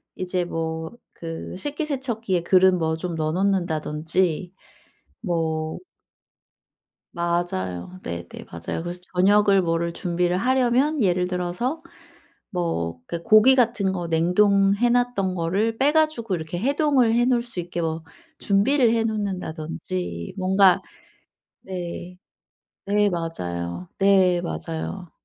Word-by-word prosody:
이제 180 -1 -2
뭐 160 -1 -4 0.2
그 165 +1 -7
식기세척기에 260 - -2
그릇 185 +1 +5
뭐 160 -2 0
좀 175 +1 -4
넣어 155 -1 -1
놓는다든지 175 -2 0 0.7
뭐 160 -4 -1 1.4
맞아요. 95 - -2
네네. 85 0 -6 0.2
맞아요. 85 - -4
그래서 175 +1 -5 0.2
저녁을 200 +1 +5
뭐를 170 0 0
준비를 175 +1 0
하려면 260 +5 +2
예를 180 -4 +2
들어서 180 - -2 0.7
뭐 85 - -2
그 170 -1 -5
고기같은 215 -2 +4
거 175 -2 -4
냉동해 195 +6 +3
놨던 240 -6 +1
거를 195 +7 0
빼 285 +3 +3
가지고 310 -10 +1
이렇게 165 0 -4
해동을 275 - +2
해 240 +1 +3
놓을 245 -2 +2
수 235 -7 -5
있게 175 0 -5
뭐 160 0 -3 0.3
준비를 230 +5 +3
해 225 -1 +1
놓는다든지 155 - -4
뭔가 190 0 +4 0.8
네. 180 -1 -6 0.7
네 205 +1 +3
맞아요. 90 - -4
네. 190 -3 +4
맞아요. 170 +1 -5
180 Hz, 240 characters per minute, -24 LUFS, 165-215 Hz, 1.4 s, 그릇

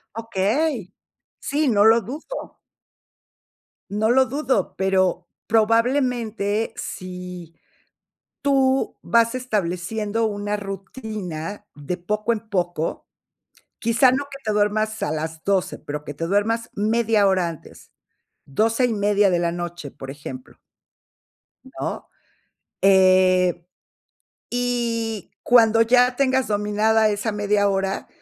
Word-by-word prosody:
Okey. 225 - -1 0.5
Sí, 295 +1 0
no 205 -3 +4
lo 225 +1 +6
dudo. 300 - -7 1.3
No 215 +2 +1
lo 260 +2 +5
dudo, 260 -6 -1
pero 190 -1 +1 0.2
probablemente, 230 -2 +1
si 180 -2 -7 0.9
tú 270 -1 +2
vas 230 0 +2
estableciendo 215 -1 -1
una 205 0 -2
rutina 195 -2 -6
de 145 +5 -4
poco 210 +5 -1
en 215 - -5
poco, 175 -4 -2 0.7
quizá 230 +3 +4
no 280 +2 0
que 275 - -8
te 215 - 0
duermas 215 +1 0
a - - 0
las 160 +1 -4
12:00, 190 -1 0
pero 150 0 -6
que 145 - -6
te 165 +4 -4
duermas 220 +5 0
media 215 0 +2
hora 185 -3 +2
antes, 165 -3 -12 0.5
12:30 210 - +2
de 175 - +2
la 170 -1 0
noche, 175 -3 -6
por 135 0 -9
ejemplo. 135 -2 -9 1.1
¿No?, - - -6 0.8
eh, 185 -2 +4 0.8
y 235 -4 -2
cuando 225 -2 +5
ya 250 +2 +4
tengas 265 -1 +2
dominada 215 +1 +2
esa 210 +2 -2
media 205 0 +1
hora, 195 0 -2
210 Hz, 110 wpm, -22 LUFS, 185-230 Hz, 1.3 s, lo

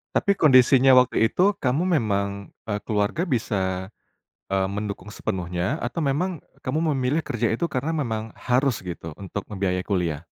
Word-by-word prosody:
Tapi 200 - +3
kondisinya 130 -4 +6
waktu 120 -2 +4
itu, 195 +7 +3
kamu 135 +6 +1
memang, 100 -3 -2 0.2
eee, 105 -2 -3
keluarga 105 +10 0
bisa, 95 -6 -1 0.6
eee, 95 -1 +1
mendukung 105 0 -5
sepenuhnya, 90 - -2
atau 170 - -3
memang 160 +4 0 0.2
kamu 145 +4 -1 0.2
memilih 130 +4 +1
kerja 120 -7 -1
itu 170 +10 0
karena 145 +4 -2
memang 115 -8 -2
harus 130 -1 +1
gitu 85 -3 -7
untuk 100 0 -5
membiayai 95 -2 -1
kuliah? 85 -6 -1
110 Hz, 145 wpm, -24 LUFS, 95-135 Hz, 0.6 s, kondisinya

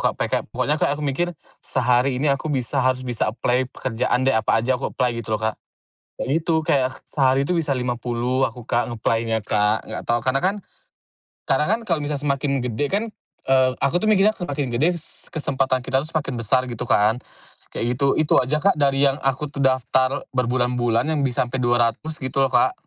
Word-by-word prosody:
Kak, - - -3
peka - - -1
pokoknya 150 +1 -1
Kak 145 - +1
aku 150 - -5
mikir, 145 +5 0 0.3
"Sehari 125 +1 +1
ini 140 +2 +2
aku 140 +3 -3
bisa, 135 -1 -1
harus 130 0 +1
bisa 120 -3 -1
apply 125 +3 0
pekerjaan 125 0 -1
deh, 135 - +3
apa 110 0 +2
aja 130 0 0
aku - - -1
apply," 125 -1 +1
gitu 110 - -11
loh 110 - -11
Kak. 110 - -2 0.6
Kayak - - -3
gitu, 165 - 0
kayak, 135 -6 +3 0.2
sehari 135 -1 +2
itu 180 - 0
bisa 165 -4 -1
50 125 +1 -1
aku 120 -1 -2
Kak, 120 0 0
ng-apply-nya 115 0 0
Kak, 105 +1 +1
enggak - - -5
tahu. 120 - +1
Karena 135 +1 +1
kan 195 +3 +1 0.9
karena 150 +4 +1
kan 220 +3 +1
kalau 170 -6 0
misalkan 145 -1 -3
semakin 140 0 0
gede 125 +4 -1
kan, 200 +6 0 0.4
eee, 130 -1 +4
aku 140 +6 +2
tuh 215 - 0
mikirnya 210 0 +4
semakin 145 - -4
gede, 160 +9 +2 0.3
kesempatan 135 -5 -1
kita 135 0 +1
semakin 155 -4 -2
besar 125 +3 +2
gitu 120 -1 -6
kan. 110 +4 +3 0.5
Kayak 115 - -3
gitu, 140 -1 +3
itu 155 - +1
aja 130 +4 0
Kak, 195 -6 +3
dari 140 0 +3
yang 140 0 +2
aku 135 +2 0
tuh 140 - -5
daftar 130 +1 +1
berbulan-bulan 125 -1 +1
yang 150 - 0
bisa 130 -3 +1
sampe 125 +2 -4
200 120 +5 +1
gitu 130 0 -2
loh 135 - +4
Kak. - - +3
130 Hz, 195 wpm, -22 LUFS, 120-145 Hz, 0.9 s, eee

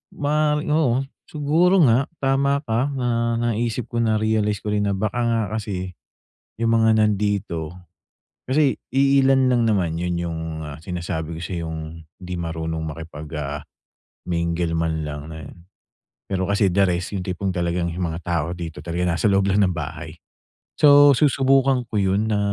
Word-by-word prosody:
ma 150 +1 +1
oo, 140 -4 +1 0.2
siguro 165 +5 +3
nga 130 +1 +3 0.2
tama 140 +1 +2
ka 115 +1 0
na 115 -2 0
naisip 115 0 -1
ko, 120 - -1
narealize 110 -2 +1
ko 105 - -2
rin 105 0 +1
na 100 - 0
baka 110 +4 -2
nga 115 -1 +1
kasi 100 -4 -4 0.6
yung 115 0 +2
mga 110 0 +4
nandito, 100 -6 0 0.7
kasi 140 +1 +2
iilan 135 -1 +3
lang 120 -2 +2
naman 90 -6 0
yun 90 0 -1
yung, 85 -1 -3 0.2
ah, 75 -1 -8
sinasabi 85 -1 -4
ko - - -7
sa'yong 85 -2 -4 0.4
hindi 90 0 -6
marunong 80 -1 -3
makipag, 80 -1 -8
ah, 75 -1 -4 0.6
mingle 85 -1 -1
man 80 -1 -1
lang 75 -1 -5
ayun. 80 0 -10 0.7
Pero 95 -1 -1
kasi 100 +1 +2
the 100 +2 +3
rest, 90 +2 -1
yung 90 - -4
tipong 95 +1 -3
talagang 85 0 0
mga 85 -1 -3
tao 85 -1 -2
dito 80 -4 -7
talaga 85 +2 -1
nasa 100 +3 +2
loob 100 0 +2
lang 100 +1 +3
ng 90 - +1
bahay. 80 0 -6 0.7
So, 145 -1 +8
susubukan 135 -2 +3
ko 105 - -1
yun 100 +2 +1
na 105 - +1
100 Hz, 155 wpm, -22 LUFS, 85-120 Hz, 0.7 s, So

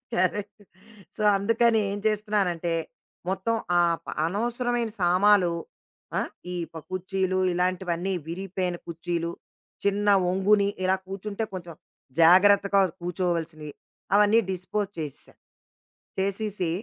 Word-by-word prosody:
Correct. 205 +3 -1 0.6
So, 215 - -2
అందుకని 230 +2 +3
ఏం 205 - -3
చేస్తున్నానంటే, 200 -6 0 0.6
మొత్తం 195 +4 0 0.3
ఆప్ 170 -1 0 0.2
అనవసరమైన 235 +4 -1
సామాలు 180 +1 +4 0.7
ఆ! - - +1 0.3
ఈ - - -3 0.2
ప - - -7
కుర్చీలు 185 0 -1 0.2
ఇలాంటివన్నీ 180 +1 -1
విరిగిపోయిన 180 0 -3
కుర్చీలు, 170 0 -3 0.5
చిన్న 200 +1 +1 0.2
వంగుని 200 +2 +3 0.2
ఇలా 190 +1 +3
కూర్చుంటే 200 +3 -4
కొంచెం 170 -3 -7 0.5
జాగ్రత్తగా 200 +3 +6 0.2
కూర్చోవాల్సినవి, 170 -4 -2 0.4
అవన్నీ 210 +2 +5
డిస్‌పోజ్ 190 +2 -2
చేసెసా. 150 -4 -6 0.9
చేసేసి 195 -2 -1
190 Hz, 95 wpm, -26 LUFS, 175-205 Hz, 0.9 s, జాగ్రత్తగా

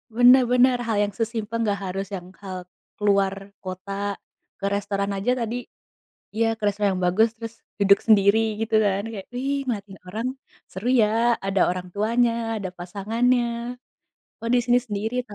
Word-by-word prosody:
Bener 250 +1 +7
bener, 250 0 +5
hal 220 -2 0
yang 205 -1 -2
sesimpel 225 0 -2
enggak 200 -2 0
harus 195 +1 -3
yang 180 -1 -8 0.2
hal 185 -1 -5 0.4
keluar 200 -2 +3 0.3
kota, 185 +1 -7 0.7
ke 200 - -4
restoran 200 0 -2
aja 210 +6 0
tadi 230 +1 -2 0.8
iya 230 +1 +2
ke 215 - -15
restoran 205 0 +1
yang 185 - -3
bagus, 220 +6 +4
terus 230 0 -7 0.3
duduk 200 0 +5
sendiri 200 0 +6 0.2
gitu 225 0 0
kan. 200 0 +1
Kayak, 195 -3 -7
ih 275 +2 -1
ngeliatin 200 -5 -4
orang, 225 +6 -3 0.4
seru 195 +6 -5
ya! 210 - +4 0.4
Ada 195 -1 0
orang 180 0 -3
tuanya, 230 +3 +2 0.3
ada 190 -2 -4
pasangannya. 225 +7 0 1.0
Kok 230 - -4
di - - +5
sini 245 0 +4
sendiri 215 +3 -3
ta 205 - -11
210 Hz, 160 wpm, -24 LUFS, 195-230 Hz, 1.0 s, Bener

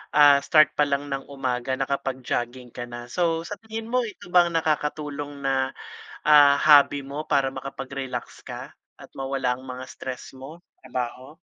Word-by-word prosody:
ah, 145 -1 +8
start 155 +1 +5
pa 150 -1 +1
lang 140 0 -2
ng 135 0 -4
umaga 130 -2 -2
nakapag-jogging 130 -2 -3
ka 120 +1 -6
na. 120 0 -9
So 165 0 0
sa 205 +4 -7
tingin 225 0 -7
mo 250 -1 +1
ito 185 -4 -11
ba 175 -1 +6
ang 170 - -5
nakakatulong 150 -2 -2
na, 135 -1 0 0.5
ah, 145 -2 +6
hobby 145 -1 +6
mo 140 +3 -6
para 135 -2 +2
makapag-relax 135 0 -6
ka, - - -7 0.3
at - - -12
mawala 135 -2 -1
ang 130 - -13
mga 130 0 -7
stress 130 -1 -7
mo, 150 +6 -10 0.2
trabaho? 130 +4 -5
140 Hz, 160 wpm, -25 LUFS, 130-150 Hz, 0.5 s, ah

